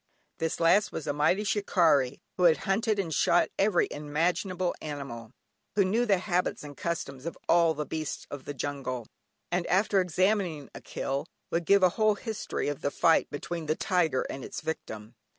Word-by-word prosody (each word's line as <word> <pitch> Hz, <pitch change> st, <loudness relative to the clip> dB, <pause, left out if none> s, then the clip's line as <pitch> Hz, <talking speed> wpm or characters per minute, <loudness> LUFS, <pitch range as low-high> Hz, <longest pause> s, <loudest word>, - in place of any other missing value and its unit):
This 165 Hz, -, -1 dB
last 175 Hz, +5 st, +4 dB
was 155 Hz, -, -5 dB
a 145 Hz, -, -1 dB
mighty 150 Hz, +8 st, +2 dB
shikarri, 165 Hz, -10 st, +2 dB
who 180 Hz, -, +2 dB
had 165 Hz, -2 st, +6 dB
hunted 215 Hz, +2 st, +1 dB
and 175 Hz, -5 st, -2 dB
shot 170 Hz, +5 st, +3 dB
every 195 Hz, -3 st, +3 dB
imaginable 175 Hz, +5 st, -1 dB
animal; 135 Hz, -7 st, -6 dB, 0.5 s
who 200 Hz, -2 st, +4 dB
knew 230 Hz, +6 st, +1 dB
the 200 Hz, -2 st, +4 dB
habits 180 Hz, -3 st, -1 dB
and 145 Hz, -1 st, -9 dB
customs 140 Hz, -3 st, -4 dB
of 170 Hz, -, -5 dB
all 170 Hz, -2 st, +4 dB
the 150 Hz, +1 st, -3 dB
beasts 155 Hz, -1 st, -4 dB
of 145 Hz, -2 st, -7 dB
the 145 Hz, -, -5 dB
jungle, 130 Hz, -3 st, -4 dB, 0.5 s
and 175 Hz, 0 st, 0 dB
after 195 Hz, +1 st, +3 dB
examining 180 Hz, -3 st, 0 dB
a -, -, -9 dB
"kill" 140 Hz, +3 st, -3 dB, 0.2 s
would 170 Hz, 0 st, 0 dB
give 200 Hz, -1 st, +5 dB
a 185 Hz, -, +7 dB
whole 215 Hz, -1 st, +4 dB
history 220 Hz, 0 st, -4 dB
of 145 Hz, -1 st, -3 dB
the -, -, 0 dB
fight 165 Hz, +3 st, +3 dB
between 165 Hz, +2 st, -5 dB
the 155 Hz, -, +1 dB
tiger 165 Hz, -8 st, +1 dB
and 135 Hz, -, -6 dB
its -, -, -6 dB
victim. 110 Hz, -8 st, -6 dB
165 Hz, 180 wpm, -28 LUFS, 145-190 Hz, 0.5 s, a